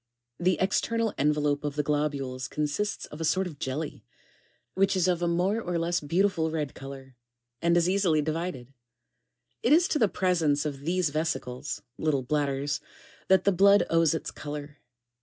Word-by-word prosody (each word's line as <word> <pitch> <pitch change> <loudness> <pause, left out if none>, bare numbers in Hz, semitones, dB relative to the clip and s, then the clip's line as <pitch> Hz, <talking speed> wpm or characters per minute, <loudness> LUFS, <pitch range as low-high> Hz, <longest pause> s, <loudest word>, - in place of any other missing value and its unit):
The 180 +1 +2
external 225 +4 +1
envelope 150 0 +1
of 145 -1 -3
the 150 - 0
globules 140 -3 -1
consists 150 +8 -2
of 150 - -10
a - - -1
3 - - +2
sort 185 +4 +2
of 155 -6 -8
jelly, 145 +4 -4 0.7
which 195 +1 +2
is 185 -1 +2
of 175 -2 +1
a 175 - +1
more 180 +6 +1
or 175 -4 -2
less 170 +1 0
beautiful 165 +2 +1
red 155 -3 -3
colour, 135 -1 -10 0.5
and 170 0 +3
is 170 0 +3
easily 185 -4 +2
divided: 155 -4 -3 0.9
it 240 - +1
is 335 +4 +6
to 300 - +1
the 220 - +5
presence 165 -6 +1
of 145 -2 -3
these 175 -2 +1
vesicles, 145 -4 -3 0.2
(little 145 -4 +1
bladders,) 145 +1 -1 0.5
that 190 -1 +4
the 200 - +4
blood 200 +2 +5
owes 165 -1 +4
its 160 - -4
colour. 145 0 -7
160 Hz, 170 wpm, -28 LUFS, 145-185 Hz, 0.9 s, is